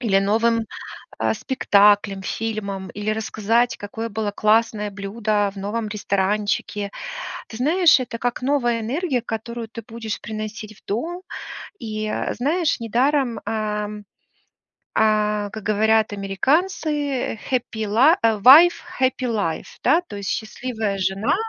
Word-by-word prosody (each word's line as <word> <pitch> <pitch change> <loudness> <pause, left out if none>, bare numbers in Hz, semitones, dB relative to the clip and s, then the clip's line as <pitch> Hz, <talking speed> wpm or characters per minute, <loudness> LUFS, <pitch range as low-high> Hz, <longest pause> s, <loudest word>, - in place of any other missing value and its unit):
Или 210 -6 +3
новым, 225 +3 +2 0.5
а, - - +1
спектаклем, 205 -5 +3
фильмом, 200 -3 -3
или 210 +1 -2
рассказать, 220 +2 0
какое 225 +3 -5
было 215 -1 -2
классное 215 0 +2
блюдо 205 +1 -1
в - - -11
новом 215 +3 -3
ресторанчике. 205 0 -1 0.6
Ты 220 - -8
знаешь, 320 +5 +5
это 240 -2 -4
как 245 +1 -2
новая 250 -3 +1
энергия, 265 +3 -1
которую 230 0 -5
ты 230 0 -8
будешь 225 -1 -5
приносить 215 0 -6
в - - -41
дом. 330 - -3 0.6
И, 215 -1 -4
э, - - -2
знаешь, 310 +5 0
недаром, 245 +2 +1
эм, 210 -1 -3 1.0
э, 210 -1 +2
как 220 - -7
говорят 220 +1 +2
американцы: 285 - 0 0.2
"Happy 245 -2 -1
li" 250 - +5
э, 225 -2 +3
"wife 300 - +9 0.3
happy 260 0 +1
life". 200 -9 -2
Да, 335 - +4
то - - -8
есть 200 -1 -4
счастливая 220 -2 -3
жена- 195 - +1
220 Hz, 130 wpm, -22 LUFS, 210-245 Hz, 1.0 s, wife